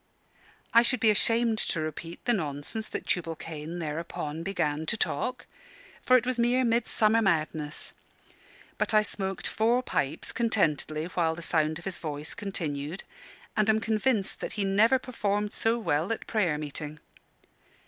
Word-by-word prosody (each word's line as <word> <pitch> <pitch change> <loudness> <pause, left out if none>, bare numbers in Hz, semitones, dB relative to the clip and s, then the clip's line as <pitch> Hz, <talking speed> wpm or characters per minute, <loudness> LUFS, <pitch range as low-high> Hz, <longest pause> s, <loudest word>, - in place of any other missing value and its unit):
I 230 - +8
should 240 +1 +2
be 220 -1 +5
ashamed 230 +1 +2
to 165 - -1
repeat 155 +2 -5
the 240 - +4
nonsense 160 +4 -3
that - - -5
Tubal 165 -3 -1
Cain 160 +1 -6
thereupon 160 -1 -4
began 160 -4 -1
to 230 - +1
talk; 255 +3 -1 0.6
for 255 - +6
it 245 - -1
was 255 -1 -1
mere 245 +2 +3
midsummer 230 -1 +3
madness. 155 -5 -1 0.9
But - - +1
I 215 - +6
smoked 195 -2 -3
four 235 +3 +2
pipes 140 - -1
contentedly 160 - +1
while 165 -2 0
the 170 - -8
sound 155 -1 +1
of 175 - -12
his 190 -2 -1
voice 150 -1 -4
continued, 165 -6 -4 0.5
and 215 -1 +2
am 220 0 +4
convinced 220 -1 0
that - - -4
he 210 - -1
never 215 +7 +4
performed 210 -5 -2
so 225 +1 +1
well 165 -4 0
at 230 - -3
prayer 185 -9 +1
meeting. 150 0 -5
195 Hz, 155 wpm, -28 LUFS, 155-225 Hz, 0.9 s, I